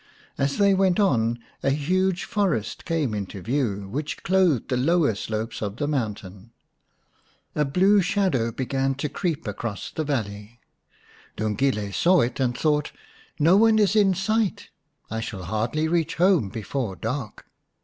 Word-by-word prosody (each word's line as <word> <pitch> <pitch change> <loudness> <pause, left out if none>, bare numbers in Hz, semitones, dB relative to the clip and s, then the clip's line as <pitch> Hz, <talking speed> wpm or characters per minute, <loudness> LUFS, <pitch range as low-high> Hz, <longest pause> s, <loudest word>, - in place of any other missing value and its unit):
As 140 0 -1
they 200 -1 +4
went 190 0 +2
on 120 - +2 0.2
a - - +1
huge 180 +6 +1
forest 185 - -1
came 160 -8 0
into 100 -1 -5
view, 110 -5 -1
which 145 +9 -4
clothed 180 - +2
the 125 - +1
lower 150 +1 +2
slopes 110 +2 -4
of 105 0 -4
the 145 - -1
mountain. 105 -6 -4 1.0
A 150 - +1
blue 190 +8 +4
shadow 180 - +1
began 135 +2 -1
to 145 +2 -2
creep 165 - -3
across 105 +1 -5
the 160 - -3
valley. 110 -5 -4 0.8
Lungile 105 -1 -1
saw 180 - +4
it, 120 +4 -2
and 125 -2 0
thought, 150 -2 +1 0.3
" - - -29
No 165 +5 +5
one 220 +1 +5
is 210 0 +3
in 200 -3 +4
sight, 215 +2 -1 0.4
I 110 - -2
shall 100 -4 -5
hardly 115 - -1
reach 165 +1 0
home 175 - +3
before 110 0 -4
dark. 115 +2 -5
140 Hz, 150 wpm, -24 LUFS, 110-180 Hz, 1.0 s, No